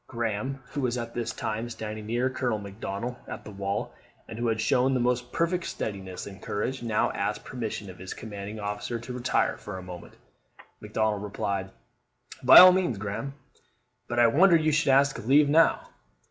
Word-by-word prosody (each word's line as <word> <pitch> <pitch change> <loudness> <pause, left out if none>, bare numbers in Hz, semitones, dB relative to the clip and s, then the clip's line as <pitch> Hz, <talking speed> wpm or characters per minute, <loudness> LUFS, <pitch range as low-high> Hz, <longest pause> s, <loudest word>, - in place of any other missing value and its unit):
Graham, 120 +2 -3
who 145 - -3
was 125 -1 0
at 115 -1 -5
this 120 -1 -2
time 115 +1 -4
standing 110 -2 -6
near 120 +3 +1
Colonel 125 -3 -1
Macdonnell 105 +4 -6
at - - -8
the 105 - -8
wall, 100 0 -3 0.3
and 110 - -8
who 120 - 0
had 110 -1 0
shown 130 +4 +2
the - - +1
most 125 0 0
perfect 170 +1 0
steadiness 95 -3 -5
and 100 -1 -10
courage, 125 +6 -3
now 115 -3 +1
asked - - -2
permission 110 -4 -5
of 90 -1 -11
his 95 0 -7
commanding 105 0 -7
officer 105 +3 -3
to 120 +2 -8
retire 125 0 0
for 105 -2 -7
a 95 - -8
moment. 90 -1 -10 0.6
Macdonnell 105 0 -1
replied, 100 -1 -3 0.7
"By 125 - +8
all 185 0 +12
means, 180 - 0
Graham; 100 +8 -5 0.7
but 120 - -4
I 120 - +6
wonder 170 +10 +5
you 155 -1 +3
should 155 0 +2
ask 140 -1 +3
leave 140 +5 +5
now." 165 +3 +3
115 Hz, 180 wpm, -27 LUFS, 105-130 Hz, 0.7 s, all